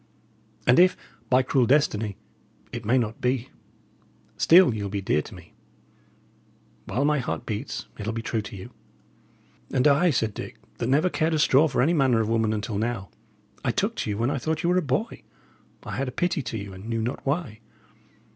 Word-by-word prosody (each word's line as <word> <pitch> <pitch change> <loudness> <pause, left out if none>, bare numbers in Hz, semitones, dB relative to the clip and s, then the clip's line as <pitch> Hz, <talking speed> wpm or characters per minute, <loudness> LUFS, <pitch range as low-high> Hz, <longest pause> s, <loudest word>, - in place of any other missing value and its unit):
And 125 +4 +5
if, 180 +1 +5 0.3
by 130 0 +4
cruel 125 -1 +2
destiny, 110 -8 +1 0.5
it 120 -2 -6
may 120 +5 +3
not 115 -2 -2
be, 125 0 0 0.9
still 175 -5 +6
ye'll 100 -2 -3
be 100 +1 -2
dear 95 -5 +1
to - - -11
me. - - -15 1.3
While 140 +3 -1
my 150 0 +2
heart 125 -1 -4
beats, 105 -2 -4
it'll 105 +2 -2
be 115 0 -4
true 115 -1 -1
to 105 0 -9
you." 95 - -9 1.0
"And 130 +2 +3
I," 150 +5 +4
said 110 -7 0
Dick, - - -8 0.2
"that 120 - -1
never 155 +7 +3
cared 160 0 +1
a - - +1
straw 150 0 +4
for 135 - +1
any 160 +5 +3
manner 130 -7 +3
of 110 -1 0
woman 110 -1 +1
until 105 -1 -2
now, 110 -4 -3 0.5
I - - 0
took - - 0
to - - -2
you 100 - -2
when 120 +4 0
I 140 - -1
thought 160 +4 -2
ye - - +1
were 180 - +3
a - - +3
boy. 155 - -2 0.6
I - - -5
had 135 +1 -1
a - - -3
pity 175 +2 0
to 115 - -5
you, 100 -2 -7
and 95 +4 -9
knew 115 -1 -1
not 120 +4 -4
why. 140 -6 -2
125 Hz, 200 wpm, -25 LUFS, 110-145 Hz, 1.3 s, still